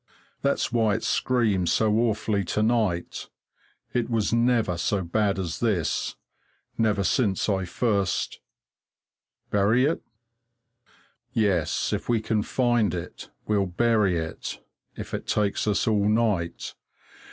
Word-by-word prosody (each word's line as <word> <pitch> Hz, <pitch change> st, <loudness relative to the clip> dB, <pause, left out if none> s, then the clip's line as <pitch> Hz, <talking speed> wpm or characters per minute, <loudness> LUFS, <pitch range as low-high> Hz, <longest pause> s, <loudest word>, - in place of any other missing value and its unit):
That's 140 Hz, -1 st, 0 dB
why 110 Hz, -3 st, +2 dB
it 110 Hz, -, -4 dB
screams 110 Hz, -8 st, +1 dB
so 105 Hz, +4 st, +2 dB
awfully 110 Hz, -3 st, 0 dB
to 105 Hz, -, 0 dB
night 110 Hz, -7 st, 0 dB, 0.6 s
it 120 Hz, -1 st, 0 dB
was 115 Hz, -2 st, 0 dB
never 115 Hz, -5 st, +2 dB
so 95 Hz, +3 st, -1 dB
bad 100 Hz, +3 st, 0 dB
as 90 Hz, -4 st, -3 dB
this 95 Hz, -10 st, 0 dB, 0.6 s
never 105 Hz, -3 st, +1 dB
since 100 Hz, -1 st, +1 dB
I 95 Hz, -3 st, 0 dB
first 100 Hz, 0 st, -1 dB, 1.1 s
Bury 105 Hz, +6 st, +3 dB
it? 155 Hz, -, 0 dB, 1.3 s
Yes, 100 Hz, -8 st, +1 dB
if -, -, -3 dB
we 120 Hz, -2 st, +3 dB
can 110 Hz, 0 st, 0 dB
find 120 Hz, -3 st, +1 dB
it, 85 Hz, 0 st, -7 dB, 0.2 s
we'll 100 Hz, -2 st, +1 dB
bury 105 Hz, -1 st, +2 dB
it, 80 Hz, 0 st, -5 dB, 0.4 s
if -, -, -7 dB
it -, -, -4 dB
takes 105 Hz, 0 st, 0 dB
us 105 Hz, -1 st, +1 dB
all 105 Hz, -2 st, +2 dB
night. 105 Hz, -7 st, 0 dB
105 Hz, 125 wpm, -25 LUFS, 95-115 Hz, 1.3 s, Bury